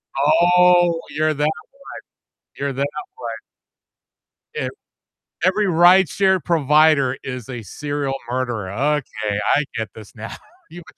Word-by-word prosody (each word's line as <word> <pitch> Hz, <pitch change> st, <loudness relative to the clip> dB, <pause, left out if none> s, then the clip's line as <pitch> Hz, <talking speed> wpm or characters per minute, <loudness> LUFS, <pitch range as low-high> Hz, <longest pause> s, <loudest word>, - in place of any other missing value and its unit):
Oh, 175 Hz, +3 st, +4 dB
you're 155 Hz, +1 st, 0 dB
that 150 Hz, 0 st, -3 dB
way. 150 Hz, -, +3 dB, 1.1 s
You're 140 Hz, 0 st, -2 dB
that 140 Hz, +2 st, -1 dB, 0.3 s
way. 115 Hz, -2 st, -5 dB, 1.2 s
If -, -, -3 dB, 0.7 s
every 200 Hz, +3 st, +2 dB
rideshare 185 Hz, +1 st, +4 dB
provider 150 Hz, -4 st, +3 dB
is 125 Hz, -2 st, -7 dB
a 120 Hz, -2 st, -6 dB
serial 145 Hz, +4 st, -4 dB
murder, 120 Hz, -6 st, -3 dB
okay, 115 Hz, -5 st, -1 dB, 0.2 s
I 150 Hz, -, +2 dB
get 110 Hz, -1 st, -3 dB
this 110 Hz, -1 st, -13 dB
now. 110 Hz, +1 st, -8 dB, 0.3 s
You 175 Hz, -, -10 dB
w -, -, -15 dB
145 Hz, 120 wpm, -20 LUFS, 125-170 Hz, 1.2 s, Oh